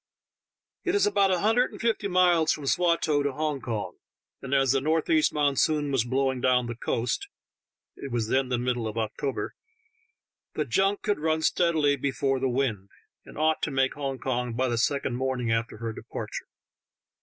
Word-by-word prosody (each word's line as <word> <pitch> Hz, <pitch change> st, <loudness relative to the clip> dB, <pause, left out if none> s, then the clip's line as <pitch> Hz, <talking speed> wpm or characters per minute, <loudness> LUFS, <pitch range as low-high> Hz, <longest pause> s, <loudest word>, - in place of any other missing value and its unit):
It 365 Hz, +1 st, 0 dB
is 405 Hz, -, +4 dB
about 200 Hz, -1 st, +3 dB
a 180 Hz, -2 st, +1 dB
hun 220 Hz, +3 st, +2 dB
dred 250 Hz, -, +3 dB
and -, -, -11 dB
fifty 225 Hz, -3 st, 0 dB
miles 175 Hz, -4 st, +4 dB
from 145 Hz, -, -3 dB
Swatow 170 Hz, -2 st, +2 dB
to 140 Hz, -1 st, -1 dB
Hong 150 Hz, -1 st, -2 dB
Kong, 110 Hz, -2 st, -4 dB, 0.4 s
and 135 Hz, -, -7 dB
as 135 Hz, -2 st, +3 dB
the 135 Hz, 0 st, +2 dB
northeast 155 Hz, +1 st, +2 dB
monsoon 145 Hz, 0 st, +1 dB
was 130 Hz, -4 st, +1 dB
blowing 130 Hz, 0 st, 0 dB
down 125 Hz, -1 st, +3 dB
the 120 Hz, -, -4 dB
coast 120 Hz, -, -2 dB, 0.4 s
— -, -, -65 dB
it 140 Hz, -, -5 dB
was 115 Hz, -2 st, -1 dB
then 130 Hz, +2 st, +1 dB
the 125 Hz, -, +1 dB
middle 120 Hz, -1 st, -1 dB
of 110 Hz, +1 st, -6 dB
October 120 Hz, +5 st, -3 dB, 0.5 s
— 465 Hz, 0 st, -50 dB
the 150 Hz, -, 0 dB
junk 195 Hz, -, +1 dB
could 205 Hz, -4 st, 0 dB
run 160 Hz, +1 st, 0 dB
steadily 155 Hz, -5 st, +2 dB
before 135 Hz, 0 st, 0 dB
the 130 Hz, 0 st, 0 dB
wind, 120 Hz, -7 st, -1 dB, 0.4 s
and -, -, -12 dB
ought 155 Hz, +1 st, +1 dB
to -, -, 0 dB
make 135 Hz, -1 st, +1 dB
Hong 135 Hz, -2 st, -4 dB
Kong 125 Hz, -1 st, -2 dB
by 130 Hz, +3 st, 0 dB
the 120 Hz, -, -1 dB
second 135 Hz, -1 st, 0 dB
morn 130 Hz, 0 st, -1 dB
ing 115 Hz, -2 st, -1 dB
after 115 Hz, -1 st, -1 dB
her 115 Hz, 0 st, -4 dB
departure. -, -, -7 dB
135 Hz, 190 wpm, -27 LUFS, 125-160 Hz, 0.5 s, is